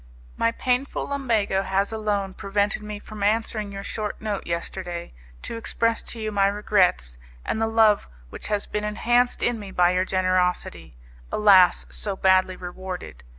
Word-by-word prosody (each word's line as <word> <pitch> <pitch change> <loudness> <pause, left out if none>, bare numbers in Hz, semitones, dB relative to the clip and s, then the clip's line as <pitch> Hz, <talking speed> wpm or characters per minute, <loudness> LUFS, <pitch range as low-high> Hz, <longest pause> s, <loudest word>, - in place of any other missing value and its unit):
My 230 - +2
painful 250 +3 -1
lumbago 230 -9 +1
has 195 +2 0
alone 205 -3 -1
prevented 205 +2 -1
me 210 0 -6
from 210 0 -10
answering 215 0 0
your 195 0 -6
short 210 0 -4
note 210 -2 -4
yesterday, 170 0 -4 0.3
to - - -5
express 230 0 0
to 235 - -6
you 215 -1 -3
my 200 -1 +3
regrets, 185 - +1 0.3
and 220 - -1
the 225 - +2
love 220 -2 +4 0.2
which - - -6
has 205 -1 -1
been 210 - -3
enhanced 240 +4 +1
in 240 -2 +1
me 205 -2 -8
by 180 -1 +3
your 180 +1 +1
generosity, 185 - 0 0.3
alas! 195 -4 +5
so 200 -2 -3
badly 185 -1 +3
rewarded. 180 - -7
205 Hz, 155 wpm, -24 LUFS, 185-220 Hz, 0.3 s, alas